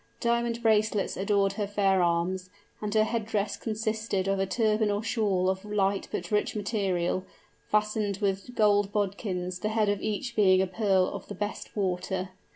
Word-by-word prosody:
Diamond 235 0 0
bracelets 215 -2 +2
adorned 195 0 +1
her 205 0 -2
fair 195 -2 +2
arms; 175 +2 0 0.3
and 210 -1 -2
her 215 - +5
head 230 0 -1
dress 205 -2 -1
consisted 215 -3 -2
of 195 0 +1
a 195 - +1
turban 215 0 +2
or 205 +1 -1
shawl 205 -6 +1
of 190 +1 0
light 200 -2 0
but 180 - -4
rich 210 +1 +1
material, 195 -4 0 0.5
fastened 210 -1 +1
with 195 +4 -2
golden 205 -2 +3
bodkins, 185 -3 -2
the 210 - -1
head 215 -1 +2
of 205 -1 0
each 235 +3 -3
being 190 -3 +5
a 190 - +3
pearl 190 -1 +2
of 200 -1 -7
the 205 - -7
best 205 0 -5
water. 185 -1 -1
205 Hz, 170 wpm, -28 LUFS, 190-215 Hz, 0.5 s, her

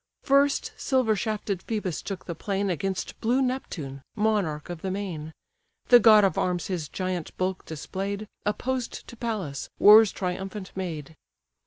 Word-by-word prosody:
First 280 - +3
silver 260 - +2
shafted 210 -3 -2
Phœbus 205 -7 -2
took 195 -2 -6
the 170 - -4
plain 195 +3 -1
Against 190 +2 -3
blue 240 +4 +2
Neptune, 180 - -3
monarch 205 -9 0
of 175 -2 -7
the 190 - -2
main. 180 -6 -4 0.6
The 245 - +9
god 215 -3 +7
of 190 -4 +2
arms 180 -1 0
his 170 -6 -3
giant 185 -3 -4
bulk 185 0 -2
display'd, 195 +6 -4 0.2
Opposed 245 +4 -2
to - - -10
Pallas, 210 - -4
war's 215 0 +8
triumphant 190 +2 -4
maid. 160 -5 -5
195 Hz, 145 wpm, -26 LUFS, 180-220 Hz, 0.6 s, The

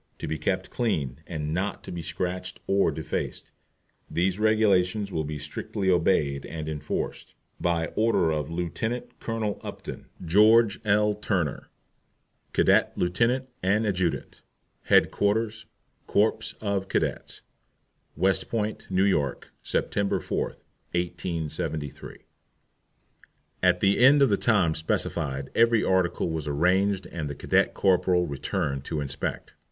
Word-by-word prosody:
To - - -5
be 80 - -3
kept - - -1
clean, 75 - -1
and 75 -3 -3
not 95 +4 -2
to - - -8
be 85 - -4
scratched 90 +3 -3
or 100 0 +3
defaced. 80 - -4 0.6
These 95 +3 0
Regulations 105 -2 +2
will 80 - -1
be 75 0 -4
strictly 95 +6 -2
obeyed 75 -5 +2
and 80 -2 -6
enforced. 75 -2 -4 0.2
By 85 -1 0
order 110 -7 +2
of 75 -1 -2
LIEUT. 110 +9 -3
COLONEL 110 -3 -3
UPTON, - - -8 0.2
GEORGE 105 +3 +5
L. 105 0 +3
TURNER, 95 -8 -2 0.8
Cadet - - +3
Lieut. 120 +9 +1
and 105 +4 +2
Adjutant. 90 -4 -2 0.4
HEADQUARTERS, 110 +2 +2 0.4
CORPS 110 +1 +1
OF 100 -2 -1
CADETS, - - -2 0.7
West 95 0 +1
Point, 110 -2 -2
N. 95 - -1
Y., 75 -8 +2 0.3
Sept. 100 -1 -1
4, - - -1 0.5
1873. 85 -4 -4 1.4
At 90 -1 +3
the 100 0 +3
end 140 +3 +7
of 135 - +4
the 100 - +3
time 100 -9 +3
specified 70 -3 -2
every 115 -1 +4
article 90 -2 +1
was 80 -2 -3
arranged 95 +6 +2
and 80 -4 -5
the 70 - -5
cadet - - +1
corporal 90 -2 +3
returned 70 -2 -2
to 80 - -3
inspect. 70 -2 -4
95 Hz, 125 wpm, -26 LUFS, 80-105 Hz, 1.4 s, end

